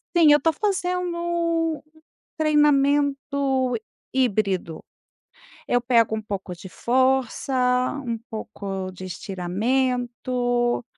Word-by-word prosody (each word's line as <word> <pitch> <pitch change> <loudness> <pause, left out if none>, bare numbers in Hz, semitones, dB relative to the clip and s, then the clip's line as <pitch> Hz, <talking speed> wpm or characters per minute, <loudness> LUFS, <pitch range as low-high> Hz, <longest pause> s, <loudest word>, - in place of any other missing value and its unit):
Sim, 320 -3 +7
eu 295 - +5
tô 325 +3 +2
fazendo 360 -3 -1
um 335 -2 0 0.6
treinamento 280 -3 +2 0.4
híbrido. 200 -9 0 0.9
Eu 245 - +3
pego 230 -3 +3
um 220 - -4
pouco 195 -3 -5
de 190 - -10
força, 260 +5 +1 0.5
um 230 -1 -2
pouco 200 -4 -5
de 185 0 -10
estiramento, 240 +6 -1
255 Hz, 95 wpm, -24 LUFS, 215-295 Hz, 0.9 s, Sim